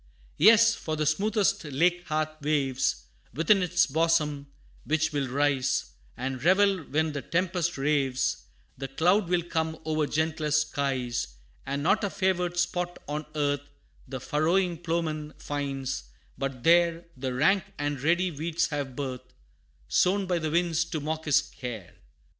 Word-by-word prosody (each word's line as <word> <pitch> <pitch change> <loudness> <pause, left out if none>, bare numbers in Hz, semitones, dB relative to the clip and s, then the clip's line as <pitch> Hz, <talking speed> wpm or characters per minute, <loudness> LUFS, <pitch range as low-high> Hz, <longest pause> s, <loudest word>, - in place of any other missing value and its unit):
Yes, 225 +5 +7
for 155 -7 -4
the 155 0 -1
smoothest 200 +7 +1
lake 170 +5 +1
hath 155 0 -2
waves 135 -3 0 0.3
Within 175 +6 +4
its 180 0 +3
bosom, 150 -2 +1 0.4
which 155 +1 0
will 140 -2 0
rise 140 0 0 0.3
And 130 +1 -4
revel 190 +2 +4
when 155 +2 0
the 145 -1 -4
tempest 175 +2 -1
raves; 135 -2 0 0.3
The 135 - -3
cloud 175 +8 +2
will 175 -1 +2
come 160 -1 -2
o'er 155 -1 0
gentlest 155 -1 0
skies; 125 - -2 0.3
And 140 0 -2
not 210 +7 +2
a 200 - +1
favored 180 -2 0
spot 175 0 -1
on 150 +1 -4
earth, 145 -2 0 0.5
The 130 0 -5
furrowing 170 +6 +1
ploughman 160 -3 -2
finds, 135 - -3 0.3
but 135 -2 -4
there 170 +1 +4
The 130 -1 -3
rank 190 +9 +3
and 145 -2 -2
ready 175 +4 +2
weeds 165 +3 -1
have 140 -4 -4
birth, 130 -2 -6 0.5
Sown 195 - +2
by 180 -2 0
the 155 -1 -2
winds 170 0 +1
to 165 -2 -4
mock 155 +2 -3
his 150 -4 +4
care. 115 -7 -8
155 Hz, 145 wpm, -27 LUFS, 140-175 Hz, 0.5 s, Yes